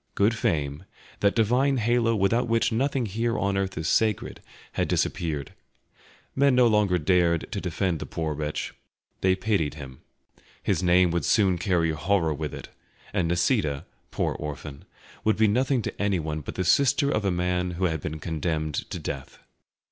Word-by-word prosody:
Good 105 Hz, +3 st, +3 dB
fame, 75 Hz, -9 st, -1 dB, 0.3 s
that 100 Hz, 0 st, +2 dB
divine 125 Hz, +5 st, +2 dB
halo 115 Hz, 0 st, +2 dB
without 115 Hz, +5 st, +2 dB
which 115 Hz, +1 st, +2 dB
nothing 130 Hz, +2 st, 0 dB
here 115 Hz, +3 st, -1 dB
on 100 Hz, 0 st, 0 dB
earth 95 Hz, -2 st, -2 dB
is 80 Hz, -, -2 dB
sacred, 110 Hz, -3 st, 0 dB, 0.3 s
had -, -, -1 dB
disappeared. 75 Hz, -5 st, -1 dB, 0.8 s
Men 140 Hz, -1 st, +4 dB
no 125 Hz, -1 st, +5 dB
longer 105 Hz, -5 st, +3 dB
dared 85 Hz, 0 st, +2 dB
to -, -, -3 dB
defend 90 Hz, -5 st, -1 dB
the -, -, -6 dB
poor 80 Hz, -2 st, -3 dB
wretch, 75 Hz, 0 st, -4 dB, 0.5 s
they 95 Hz, 0 st, +3 dB
pitied 95 Hz, -7 st, 0 dB
him. 65 Hz, -4 st, -10 dB, 0.6 s
His -, -, +1 dB
name 90 Hz, -1 st, +4 dB
would 85 Hz, -2 st, 0 dB
soon 95 Hz, -6 st, +3 dB
carry 85 Hz, -2 st, +1 dB
horror 85 Hz, 0 st, +1 dB
with 75 Hz, -1 st, -4 dB
it, -, -, -9 dB, 0.4 s
and 85 Hz, -, +1 dB
Nisida, 85 Hz, -, +1 dB, 0.2 s
poor -, -, -1 dB
orphan, 70 Hz, -1 st, -7 dB, 0.4 s
would 110 Hz, -, +2 dB
be 110 Hz, 0 st, +4 dB
nothing 125 Hz, +3 st, +1 dB
to -, -, -5 dB
anyone 80 Hz, -6 st, -1 dB
but -, -, -7 dB
the 95 Hz, -, -1 dB
sister 140 Hz, +7 st, +3 dB
of 105 Hz, -, 0 dB
a 100 Hz, -, +1 dB
man 90 Hz, 0 st, 0 dB
who 95 Hz, -, +1 dB
had 80 Hz, -4 st, -1 dB
been 80 Hz, +1 st, -4 dB
condemned 80 Hz, -1 st, -2 dB
to -, -, -4 dB
death. 70 Hz, -1 st, -6 dB
90 Hz, 170 wpm, -26 LUFS, 80-110 Hz, 0.8 s, no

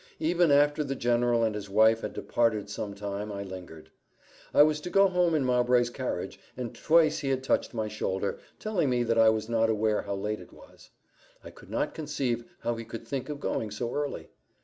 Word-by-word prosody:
Even 170 Hz, +1 st, +2 dB
after 145 Hz, +1 st, +4 dB
the 135 Hz, -1 st, -3 dB
general 120 Hz, -1 st, +2 dB
and 110 Hz, -1 st, +1 dB
his 105 Hz, -1 st, -6 dB
wife 110 Hz, +2 st, +4 dB
had -, -, -4 dB
departed 110 Hz, -4 st, 0 dB
some 100 Hz, -1 st, -5 dB
time, 100 Hz, +1 st, -5 dB
I 100 Hz, 0 st, -4 dB
lingered. 90 Hz, -5 st, -10 dB, 0.6 s
I -, -, +7 dB
was 155 Hz, 0 st, +1 dB
to 180 Hz, -, -5 dB
go 195 Hz, +2 st, +5 dB
home 180 Hz, -3 st, +2 dB
in 145 Hz, -4 st, +1 dB
Mowbray's 125 Hz, -1 st, +3 dB
carriage, -, -, -4 dB, 0.2 s
and 125 Hz, -2 st, -4 dB
twice 160 Hz, -1 st, +3 dB
he 135 Hz, -, -2 dB
had 130 Hz, -1 st, 0 dB
touched 130 Hz, -, 0 dB
my 110 Hz, -1 st, -1 dB
shoulder, 100 Hz, -2 st, -2 dB, 0.2 s
telling 185 Hz, -9 st, 0 dB
me 125 Hz, -1 st, +1 dB
that 115 Hz, -1 st, +1 dB
I 110 Hz, 0 st, +7 dB
was 110 Hz, 0 st, 0 dB
not 115 Hz, -1 st, +2 dB
aware 110 Hz, -1 st, +1 dB
how 100 Hz, -1 st, -4 dB
late 105 Hz, +2 st, -3 dB
it -, -, -13 dB
was. -, -, -17 dB, 0.5 s
I -, -, -10 dB
could -, -, -16 dB
not -, -, -1 dB
conceive 135 Hz, -6 st, -2 dB, 0.2 s
how 120 Hz, -, 0 dB
he 115 Hz, -, -5 dB
could 115 Hz, 0 st, -8 dB
think 135 Hz, 0 st, -4 dB
of 145 Hz, -1 st, -5 dB
going 110 Hz, -6 st, -2 dB
so 115 Hz, +3 st, -4 dB
early. 145 Hz, -1 st, -4 dB
120 Hz, 210 wpm, -28 LUFS, 105-145 Hz, 0.6 s, I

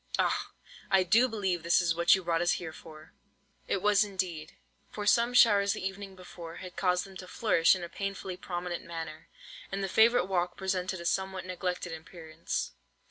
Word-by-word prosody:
Ah! -, -, 0 dB, 0.4 s
I 190 Hz, -1 st, +4 dB
do 225 Hz, +8 st, +4 dB
believe 195 Hz, -7 st, -1 dB
this 170 Hz, +1 st, +3 dB
is 170 Hz, -2 st, +2 dB
what 170 Hz, +2 st, +5 dB
you 190 Hz, -, -3 dB
have -, -, -19 dB
brought 165 Hz, -1 st, +1 dB
us 175 Hz, -, +3 dB
here 160 Hz, -3 st, -5 dB
for!" 155 Hz, -1 st, -13 dB, 0.5 s
It 190 Hz, -, -1 dB
was 210 Hz, 0 st, +5 dB
indeed; 185 Hz, -6 st, -4 dB, 0.4 s
for 210 Hz, -, -6 dB
some 235 Hz, +3 st, +4 dB
showers 200 Hz, -4 st, +6 dB
the -, -, -5 dB
evening 195 Hz, 0 st, -8 dB
before, 170 Hz, -2 st, -10 dB
had 185 Hz, 0 st, -9 dB
caused 180 Hz, -1 st, +1 dB
them 195 Hz, -1 st, -13 dB
to 185 Hz, -, -9 dB
flourish 180 Hz, -5 st, +3 dB
in 180 Hz, -, -6 dB
a -, -, -4 dB
painfully 195 Hz, 0 st, -5 dB
prominent 175 Hz, -1 st, -5 dB
manner, 160 Hz, -2 st, -7 dB, 0.4 s
and 195 Hz, 0 st, -2 dB
the -, -, 0 dB
favourite 220 Hz, +1 st, +4 dB
walk 175 Hz, -2 st, -1 dB
presented 185 Hz, -1 st, -2 dB
a -, -, -8 dB
somewhat 190 Hz, +1 st, -1 dB
neglected 180 Hz, -1 st, -3 dB
appearance. 160 Hz, 0 st, -5 dB
185 Hz, 190 wpm, -30 LUFS, 170-195 Hz, 0.5 s, showers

